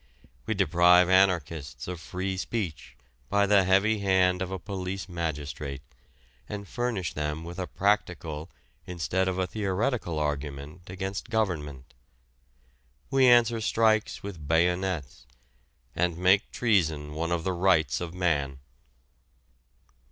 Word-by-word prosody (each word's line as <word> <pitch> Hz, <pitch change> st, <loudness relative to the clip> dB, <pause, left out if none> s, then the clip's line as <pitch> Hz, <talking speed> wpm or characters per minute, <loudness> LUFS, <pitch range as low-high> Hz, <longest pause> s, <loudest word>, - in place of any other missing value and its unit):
We 110 Hz, -, 0 dB
deprive 90 Hz, -1 st, +5 dB
anarchists 80 Hz, -8 st, +1 dB
of 90 Hz, -2 st, -5 dB
free 95 Hz, +3 st, -3 dB
speech 95 Hz, -5 st, -4 dB, 0.3 s
by 100 Hz, 0 st, +3 dB
the 100 Hz, -1 st, +4 dB
heavy 100 Hz, +4 st, +3 dB
hand 95 Hz, -2 st, +2 dB
of 95 Hz, -, -2 dB
a 95 Hz, -, -3 dB
police 95 Hz, 0 st, -5 dB
magistrate, 75 Hz, -5 st, -4 dB, 0.7 s
and 100 Hz, -1 st, -6 dB
furnish 120 Hz, -8 st, -2 dB
them 75 Hz, +1 st, -3 dB
with 85 Hz, +2 st, -8 dB
a 90 Hz, -, -3 dB
practical 90 Hz, -6 st, -1 dB, 0.4 s
instead 90 Hz, +2 st, -1 dB
of 95 Hz, -1 st, -1 dB
a 95 Hz, -, +1 dB
theoretical 105 Hz, -, -1 dB
argument 75 Hz, +3 st, -4 dB
against 95 Hz, +4 st, -5 dB
government. 75 Hz, -, -2 dB, 1.2 s
We 135 Hz, -1 st, +5 dB
answer 120 Hz, -2 st, +5 dB
strikes 110 Hz, -1 st, +1 dB
with 90 Hz, -7 st, -7 dB
bayonets, 85 Hz, -2 st, 0 dB, 0.7 s
and 90 Hz, -2 st, 0 dB
make 95 Hz, +4 st, +3 dB
treason 80 Hz, -10 st, +1 dB
one 85 Hz, +2 st, -2 dB
of 85 Hz, -1 st, 0 dB
the 95 Hz, -, -1 dB
rights 85 Hz, -6 st, +2 dB
of 85 Hz, -2 st, -4 dB
man. 70 Hz, -7 st, 0 dB
90 Hz, 120 wpm, -27 LUFS, 80-100 Hz, 1.2 s, deprive